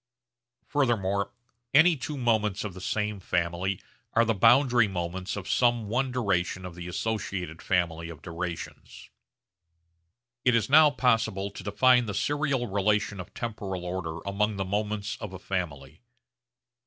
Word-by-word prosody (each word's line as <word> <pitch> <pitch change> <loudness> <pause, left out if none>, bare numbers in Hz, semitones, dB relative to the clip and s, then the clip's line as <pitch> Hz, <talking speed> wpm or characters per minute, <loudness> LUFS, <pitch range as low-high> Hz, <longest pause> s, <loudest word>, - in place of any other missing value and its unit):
Furthermore 100 -8 0 0.4
any 165 +3 +7
two 145 +2 -5
moments 110 -5 +1
of 105 -3 -5
the 95 - -10
same 105 +1 -2
family 90 +1 -1 0.3
are 115 +1 +4
the 115 - +2
boundary 120 +2 +5
moments 90 0 -4
of 100 -2 -6
some 120 -4 +2
one 130 +3 0
duration 95 -6 -1
of 90 - -7
the 90 0 -8
associated 90 -4 -3
family 85 -3 0
of 80 -3 -10
durations. 85 -1 -7 1.3
It 125 -2 +4
is 115 +3 +1
now 155 +1 +8
possible 110 -7 +1
to 100 - -9
define 125 +4 +4
the 100 - -3
serial 140 -1 0
relation 105 0 0
of 90 - -8
temporal 100 -6 -4
order 90 -3 -4
among 105 +2 0
the 95 -1 -2
moments 105 +2 -2
of 100 -3 -7
a - - -5
family. 80 -7 -5
100 Hz, 140 wpm, -27 LUFS, 90-115 Hz, 1.3 s, now